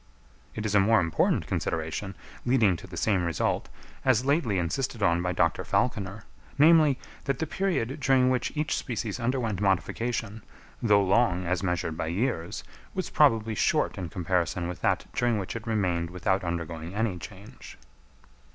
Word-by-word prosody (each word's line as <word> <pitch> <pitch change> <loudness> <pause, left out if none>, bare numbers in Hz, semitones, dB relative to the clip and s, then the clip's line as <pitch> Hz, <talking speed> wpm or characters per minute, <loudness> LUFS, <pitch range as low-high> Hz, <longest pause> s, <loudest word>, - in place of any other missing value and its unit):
It 110 - -4
is 105 - -1
a 105 - +6
more 110 +3 +4
important 85 -2 +1
consideration, 80 +5 -3 0.3
leading 115 -7 +3
to 90 - -10
the 85 -1 -9
same 95 -2 +1
result, 85 -4 -1 0.3
as 130 -1 +3
lately 140 - +1
insisted 105 +6 -2
on 85 -3 +3
by 90 0 -1
Dr. 85 -2 +1
Falconer, 105 -4 -1 0.3
namely, 155 -2 +6 0.3
that 135 -2 0
the 160 - -1
period 155 -7 -1
during 130 -1 +3
which 125 -1 0
each 150 0 0
species 115 -3 -3
underwent 115 -5 -1
modification, 110 +3 -1 0.4
though 105 -3 +4
long 95 -2 +2
as 90 +1 0
measured 90 -4 -2
by 80 - -2
years, 85 -1 -2 0.3
was 185 -2 -3
probably 115 -7 +3
short - - +1
in 90 -3 -4
comparison 90 0 -1
with 90 - -6
that - - +1
during 120 -2 +1
which 95 +1 -4
it 115 0 -6
remained 90 -6 0
without 90 +2 0
undergoing 85 0 -4
any 105 -5 -1
change. 105 +7 -11
105 Hz, 160 wpm, -27 LUFS, 90-120 Hz, 0.4 s, a